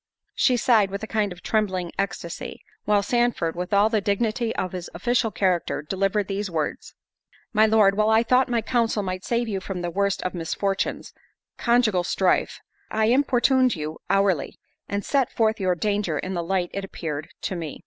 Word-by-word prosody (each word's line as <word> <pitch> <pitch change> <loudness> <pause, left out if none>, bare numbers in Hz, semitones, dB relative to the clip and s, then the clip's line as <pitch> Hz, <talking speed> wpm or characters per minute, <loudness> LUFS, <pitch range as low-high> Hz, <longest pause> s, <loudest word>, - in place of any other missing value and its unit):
She, 250 -2 +3
sighed 220 -4 +3
with 200 +2 -5
a - - -3
kind 215 -3 0
of 180 -1 -10
trembling 190 -5 0
ecstasy; 180 -3 -4 0.2
while 205 -1 +3
Sandford, 240 -7 0
with 180 +1 -4
all 205 +1 +5
the 220 -2 +1
dignity 220 +3 0
of 185 - -2
his 180 -2 -6
official 240 +5 +1
character, 185 -6 0
delivered 195 +4 0
these 200 0 -3
words—— 160 -4 -3 0.6
"My 220 0 +5
Lord, 210 -2 +4
while 215 +1 +2
I 220 +1 +4
thought 250 +2 +3
my 235 -2 0
counsel 230 -3 0
might 185 0 -4
save 235 +2 0
you 200 -3 -2
from 190 -2 -5
the 175 - -2
worst 200 +2 0
of 185 - -2
misfortunes, 195 +3 -2 0.5
conjugal 235 -6 +3
strife, 185 +1 +1 0.3
I 220 0 +1
importuned 260 -1 +3
you 155 0 -5
hourly, 195 -7 +1 0.3
and 200 0 -2
set 275 -4 +1
forth 220 -1 +1
your 185 -2 +1
danger 200 -3 -1
in 185 +5 -4
the 175 - -1
light 175 +1 -1
it 195 - -3
appeared 155 -5 -5
to 190 - -3
me. 160 -4 -6
200 Hz, 180 wpm, -24 LUFS, 185-220 Hz, 0.6 s, all